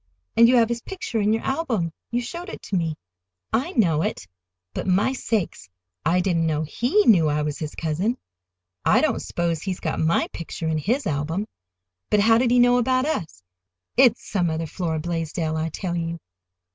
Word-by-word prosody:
"And 230 - +7
you 255 - +5
have 230 -2 +4
his 235 0 -2
picture 240 - -3
in 205 +1 +2
your 225 - 0
album. 235 - -1 0.2
You 240 +1 0
showed 345 - -6
it - - -9
to 200 - -3
me." 165 -3 0 0.6
"I 270 +11 0
know 165 - +3
it. 90 - -3 0.5
But, - - -4
my 195 +8 +2
sakes! 215 - -2 0.3
I 175 +3 +3
didn't 170 -3 +1
know 155 -1 0
he 245 - +1
knew 170 -8 +5
I 150 0 0
was 150 -1 -3
his 155 -2 -5
cousin. 175 +10 -1 0.7
I - - +4
don't - - +1
s'pose 170 -2 -2
he's 185 -1 -3
got - - -2
my 160 +1 +2
picture 165 0 -5
in 160 -1 0
his 240 - 0
album! 155 +7 -1 0.6
But 210 - +4
how 225 +2 +5
did 250 -1 +2
he 245 - +4
know 245 0 +5
about 255 +2 +2
us? 160 - -3 0.5
It's 245 -2 +4
some 180 -5 0
other 160 +1 -2
Flora 160 0 -2
Blaisdell, 165 -1 -2
I 160 +1 -1
tell 175 +2 -4
you." 165 0 -2
180 Hz, 190 wpm, -24 LUFS, 160-235 Hz, 0.7 s, And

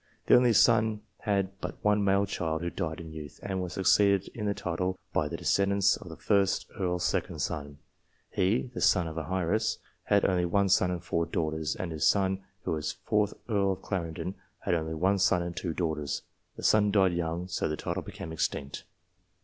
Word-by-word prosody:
This - - +6
only 125 -1 +5
son 110 -1 +4 0.2
had 100 -2 -1
but - - -5
one 105 0 +3
male 100 0 +3
child, 80 -4 -2
who 85 - -2
died 80 -1 -3
in 80 -2 -8
youth, 75 -2 -9
and 95 -2 -2
was 90 -1 -4
succeeded 100 0 +3
in 105 -2 -3
the 100 - 0
title 90 +2 -2 0.2
by 75 - +1
the - - -5
descendants 100 0 +3
of - - -10
the - - -9
1st 100 -1 +2
Earl's 90 -2 0
second - - -1
son. 70 -2 -3 0.5
He 110 +7 +1
(the - - -5
son 90 -4 +4
of 80 - -6
an 80 - -6
heiress) 95 +4 +1 0.3
had 100 -1 +3
only 90 -2 +2
one 100 +3 +2
son 90 -1 +4
and 90 -1 -3
four 85 0 -1
daughters, 80 -1 -1
and 95 -4 -4
this 80 -2 +1
son, 95 -1 +2 0.2
who - - -2
was 75 -2 -2
4th 105 -1 +2
Earl 100 -4 +2
of 95 - -11
Clarendon, 85 -1 -3 0.3
had 95 - 0
only 80 -1 -1
one 95 +5 +2
son 90 -2 +3
and 85 0 -5
two 90 - -3
daughters. 80 -5 -2 0.3
The - - -9
son 105 -1 +4
died 95 -3 +3
young, 85 +1 -2
so 90 - -1
the 75 - -2
title - - -3
became 80 - -8
extinct. 70 -3 -3
95 Hz, 200 wpm, -29 LUFS, 80-100 Hz, 0.5 s, This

